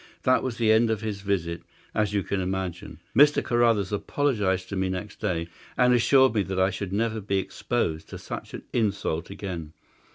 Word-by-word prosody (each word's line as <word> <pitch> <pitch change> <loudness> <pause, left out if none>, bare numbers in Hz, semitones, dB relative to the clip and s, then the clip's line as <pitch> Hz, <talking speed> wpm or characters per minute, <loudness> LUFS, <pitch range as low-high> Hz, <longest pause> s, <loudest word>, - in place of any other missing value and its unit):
That 130 0 +4
was 125 -3 -3
the 115 -2 +3
end 110 +1 +4
of 110 -2 0
his 105 -3 -4
visit, 85 -4 -1 0.3
as 105 -2 +1
you 100 -2 0
can 100 +1 -1
imagine. 95 0 -4 0.2
Mr. 145 +4 +6
Carruthers 115 -5 +2
apologized 105 -6 0
to 100 - -4
me 95 0 0
next 95 +2 -5
day, 85 -6 -1 0.3
and 125 -1 +5
assured 130 +1 +5
me 105 - +2
that 95 -1 -2
I 95 +1 +3
should 100 -2 -5
never 110 +2 0
be 100 0 0
exposed 95 -5 -2
to - - -7
such - - -7
an - - -8
insult 100 -8 0
again. 90 -6 -6
100 Hz, 190 wpm, -26 LUFS, 95-115 Hz, 0.3 s, Mr